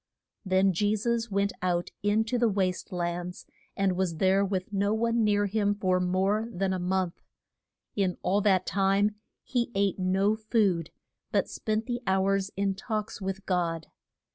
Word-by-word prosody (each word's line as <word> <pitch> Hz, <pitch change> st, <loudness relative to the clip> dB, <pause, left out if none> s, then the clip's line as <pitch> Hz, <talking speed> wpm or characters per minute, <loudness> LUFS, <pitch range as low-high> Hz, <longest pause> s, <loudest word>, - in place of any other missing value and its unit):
Then 190 Hz, -1 st, +3 dB
Je 205 Hz, +4 st, +1 dB
sus 235 Hz, +2 st, -1 dB
went 200 Hz, 0 st, 0 dB
out 175 Hz, -1 st, 0 dB
in 205 Hz, +2 st, +2 dB
to 235 Hz, +2 st, -1 dB
the 235 Hz, -1 st, +3 dB
waste 190 Hz, -1 st, -1 dB
lands, 175 Hz, 0 st, -3 dB, 0.3 s
and 195 Hz, -2 st, +2 dB
was 180 Hz, -2 st, -1 dB
there 190 Hz, +4 st, +3 dB
with 195 Hz, 0 st, -2 dB
no 200 Hz, +2 st, +1 dB
one 230 Hz, +1 st, +1 dB
near 205 Hz, -1 st, +3 dB
him 205 Hz, 0 st, +1 dB
for 185 Hz, -2 st, +1 dB
more 190 Hz, +4 st, +1 dB
than 190 Hz, 0 st, -1 dB
a 185 Hz, -, -2 dB
month. 180 Hz, -1 st, -1 dB, 0.7 s
In 190 Hz, -3 st, 0 dB
all 200 Hz, +2 st, +2 dB
that 190 Hz, -3 st, +3 dB
time 200 Hz, +2 st, +2 dB, 0.3 s
he 245 Hz, -2 st, -1 dB
ate 200 Hz, -1 st, +1 dB
no 190 Hz, +3 st, +2 dB
food, 210 Hz, -7 st, +1 dB, 0.4 s
but -, -, +1 dB
spent 215 Hz, 0 st, -2 dB
the 245 Hz, 0 st, -3 dB
hours 195 Hz, +1 st, +2 dB
in 200 Hz, 0 st, +1 dB
talks 215 Hz, 0 st, -4 dB
with 195 Hz, +1 st, -4 dB
God. 170 Hz, -3 st, -1 dB
195 Hz, 165 wpm, -28 LUFS, 185-210 Hz, 0.7 s, Then